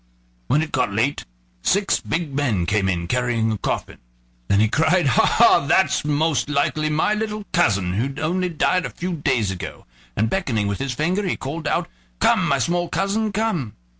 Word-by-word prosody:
When 150 - +2
it 160 - -7
got 125 -6 0
late, 115 +8 -1 0.4
six 200 - +1
big 165 -4 -3
men 125 -11 0
came 100 0 +1
in 85 -2 -1
carrying 120 -1 0
a 110 - -2
coffin. - - -3 0.5
Then 100 - +3
he 110 - +4
cried: 160 - +2
"Ha! 130 -5 +4
ha! - - +5
that's - - +3
most 150 0 0
likely 155 +1 0
my 155 +7 +1
little 215 -1 -3
cousin 95 -3 +2
who 135 +8 -2
only 180 +3 0
died 180 +2 +1
a - - -8
few 180 +1 -4
days 130 - 0
ago"; 90 - -7 0.3
and 110 - +1
beckoning 120 - -1
with 100 -1 -2
his 135 -2 -3
finger 180 +9 0
he - - 0
called 155 +4 -5
out: - - 0 0.3
"Come, - - +3
my - - +2
small 175 0 0
cousin, 210 +2 -1
come." 190 - -2
145 Hz, 185 wpm, -22 LUFS, 110-175 Hz, 0.5 s, ha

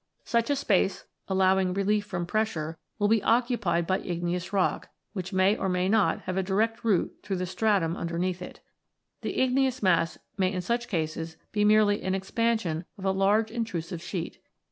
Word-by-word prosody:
Such 235 +1 +1
a 285 - +3
space, 200 -7 +1 0.2
allowing 190 -1 +2
relief 205 +1 +1
from 175 -4 -3
pressure, 170 -6 -2 0.2
will 205 -1 +2
be 220 0 +3
occupied 225 -8 +1
by 190 +2 +1
igneous 175 +1 -3
rock, 195 -2 0 0.2
which 190 -2 -5
may 190 +2 +3
or 190 - -2
may 180 0 +1
not 215 0 +2
have 185 0 -4
a - - +3
direct 220 +5 0
root 210 -6 +1
through 195 - -3
the 185 0 -2
stratum 190 -3 +1
underneath 175 +2 -2
it. - - -9 0.6
The - - -3
igneous 260 -1 +2
mass 170 -3 +2 0.2
may 185 -1 +2
in 185 -2 -2
such 235 +5 -1
cases 160 -1 -3
be 210 -1 +1
merely 210 -1 +4
an 190 0 -1
ex 190 0 -6
pansion 220 -8 0
of 195 - -7
a 190 - +3
large 205 +3 +2
intrusive 180 -7 -4
sheet. 170 -1 -5
190 Hz, 180 wpm, -27 LUFS, 180-215 Hz, 0.6 s, merely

